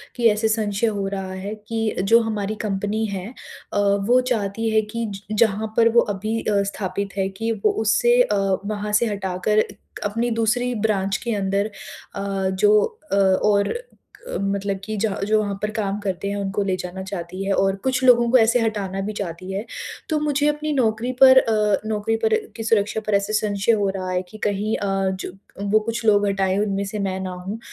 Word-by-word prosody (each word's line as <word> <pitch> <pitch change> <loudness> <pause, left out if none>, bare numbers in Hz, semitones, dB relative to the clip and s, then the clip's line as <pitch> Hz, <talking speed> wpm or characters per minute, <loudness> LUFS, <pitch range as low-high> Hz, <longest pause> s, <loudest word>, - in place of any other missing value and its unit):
की 235 -2 +4
ऐसे 215 +1 +1
संशय 215 0 0
हो 200 -2 -1
रहा 195 -1 -4
है 195 +3 -5
कि 225 -1 -1
जो 230 +4 +6
हमारी 215 -1 -2
कंपनी 205 +2 -1
है 185 +2 -5 0.5
अ, 205 - +1
वो 200 +5 +3
चाहती 220 0 -1
है 220 0 +3
कि 230 0 -2
ज - - -8 0.3
जहाँ 215 +2 -3
पर 230 0 +6
वो 235 +1 +5 0.2
अभी 215 +3 -2
अ, 205 -1 +1
स्थापित 200 0 -4
है 190 - +1
कि 225 +4 -3
उ - - +7
उससे 240 +3 +4
अ, 210 -4 +2 0.3
वहाँ 210 0 -3
से 210 +3 +4
हटाकर 200 0 0
एक 205 - -5
अपनी 230 +4 0
दूसरी 235 +2 +1
ब्रांच 195 -1 0
के 235 -2 -3
अंदर 200 +2 0 0.4
अ, 195 -1 -1
जो 210 +3 +4 0.3
अ, - - +2
और 200 +1 +3 0.6
अ, - - -3
मतलब 200 0 -1
कि 215 - -3
ज 225 - +3 0.2
जो 215 +1 +3
वहाँ 205 -1 -2
पर 210 0 -1
काम 210 -2 -2
करते 195 -1 -3
हैं, 200 - -2
उनको 200 0 -1
ले 190 -1 0
जाना 180 +1 -6
चाहती 185 -1 -5
है 200 - 0
और 195 0 +2
कुछ 260 0 0
लोगों 240 -2 +5
को 260 - +7
ऐसे 235 +1 +4
हटाना 200 -4 -2
भी 210 +2 -3
चाहती 185 0 -5
है। 200 +3 -3 0.4
तो 310 -2 +1
मुझे 295 -1 +1
अपनी 300 +1 -1
नौकरी 235 -2 +1
पर 260 -1 +9
अ, 215 -4 +2
नौकरी 215 +1 0
पर 445 - +4 0.2
की 225 - -4
सुरक्षा 220 -1 +1
पर 215 - 0
ऐसे 200 +2 0
संशय 210 0 +1
हो 205 -3 +2
रहा 185 -1 -4
है 180 0 0
कि 215 - -11
कहीं 210 +1 0
अ, - - -3 0.4
जब 190 +1 -8 0.3
वो 215 - +5
कुछ 230 +2 -4
लोग 205 -1 +4
हटाएँ, 195 -1 +1
उनमें 200 -1 0
से 210 +2 -5
मैं 190 -1 -2
ना 190 -1 -4
हूँ 185 +5 -6
210 Hz, 205 wpm, -22 LUFS, 195-225 Hz, 0.6 s, पर